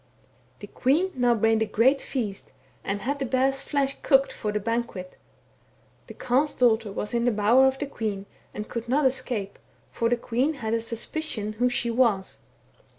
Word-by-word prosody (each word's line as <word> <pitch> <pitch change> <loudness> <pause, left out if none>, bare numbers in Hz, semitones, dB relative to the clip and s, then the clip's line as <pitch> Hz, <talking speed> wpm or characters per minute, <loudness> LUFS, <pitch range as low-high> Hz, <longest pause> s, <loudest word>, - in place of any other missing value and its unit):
" - - -35
The - - -6
queen 320 +9 +1
now 245 -2 +2
made 225 0 +2
a 220 - +1
great 260 +7 +3
feast, 215 -7 -4 0.3
and 200 +1 -3
had 280 +3 -2
the 270 - -1
bear's 265 +2 +1
flesh 275 -1 -1
cooked 270 -1 +3
for 210 - -3
the 210 - -1
banquet. 230 -4 -3 0.9
The - - -10
Carle's 275 +5 0
daughter 225 -4 +2
was 210 +2 -4
in 235 0 +1
the 245 - +3
bower 225 +5 +4
of 265 0 0
the 290 - -3
queen, 210 -7 -4 0.3
and 210 +1 -6
could 235 0 -5
not 280 +3 +2
escape, 250 -6 -1 0.3
for 230 - 0
the 245 - +2
queen 250 +6 -1
had 225 -4 -3
a 230 - +1
suspicion 230 -1 -3
who 250 0 +3
she 240 -1 -1
was. 225 -6 +1
240 Hz, 185 wpm, -26 LUFS, 220-265 Hz, 0.9 s, bower